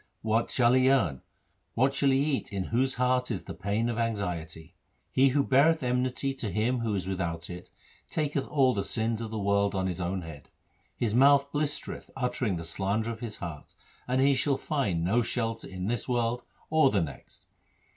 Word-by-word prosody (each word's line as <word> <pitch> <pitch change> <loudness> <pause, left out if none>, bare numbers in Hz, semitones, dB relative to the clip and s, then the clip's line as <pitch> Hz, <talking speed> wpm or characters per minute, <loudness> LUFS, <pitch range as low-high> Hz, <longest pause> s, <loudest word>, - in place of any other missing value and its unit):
What 110 +1 +1
shall 120 -1 +3
he 130 0 +5
earn, 90 - +2 0.5
what 130 +3 +3
shall 140 0 +2
he 135 - +4
eat 140 -3 0
in 100 -2 -2
whose 130 +3 +2
heart 125 0 +1
is 100 -6 -3
the - - -7
pain 105 +5 -1
of 120 -1 -2
anxiety? 90 -8 -3 0.4
He 135 +1 +4
who 140 +2 +2
beareth 140 +4 +4
enmity 125 +2 0
to 110 - -2
him 115 +6 0
who 115 -3 -1
is 95 -2 -2
without 85 -3 -3
it, 90 +1 -9 0.4
taketh 145 -3 -1
all 135 -4 +3
the 100 - -1
sins 115 +2 -1
of 115 - -4
the 110 - -4
world 100 0 +1
on 95 -1 0
his 90 -1 -3
own 90 +1 -2
head. 75 -4 -10 0.5
His 110 -3 0
mouth 140 +3 +5
blistereth 145 0 -3
uttering 125 -5 -1
the 85 -1 -5
slander 100 +6 -1
of 115 - -7
his 115 -3 -5
heart; 80 -4 -8 0.3
and 125 +1 +1
he 140 +1 +5
shall 135 +1 +1
find 115 - -1
no 105 +8 +2
shelter 115 -1 -2
in 95 -1 -5
this 120 +4 -2
world 120 0 0 0.3
or 155 -3 +5
the 100 -6 +1
next. 70 -5 -8
115 Hz, 195 wpm, -28 LUFS, 95-130 Hz, 0.5 s, he